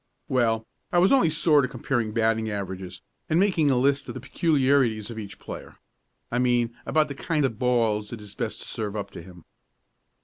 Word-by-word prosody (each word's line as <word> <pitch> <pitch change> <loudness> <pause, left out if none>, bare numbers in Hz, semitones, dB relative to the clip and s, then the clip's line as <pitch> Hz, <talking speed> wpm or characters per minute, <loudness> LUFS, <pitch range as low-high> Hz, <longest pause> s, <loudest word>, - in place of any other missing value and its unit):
"Well, 115 -3 +1 0.3
I - - +2
was 180 +2 +5
only 265 -12 +5
sort 155 -2 +4
of 130 - -1
comparing 120 -3 -1
batting 110 0 +1
averages, 95 -3 -5 0.3
and 160 - +3
making 185 -7 +3
a 130 - +3
list 140 +2 +2
of - - -6
the - - -4
peculiarities 135 -5 +1
of 110 - -6
each 100 -2 -8
player - - -9 0.5
I 120 - 0
mean 120 -2 +1
about 155 -1 +3
the 140 - -5
kind 150 +1 0
of 115 -5 -3
balls 115 -4 +1
it 120 - -6
is 105 -1 -10
best - - -4
to - - -11
serve 105 -2 -4
up 100 -1 -4
to - - -8
him." 90 -1 -14
120 Hz, 200 wpm, -26 LUFS, 110-140 Hz, 0.5 s, was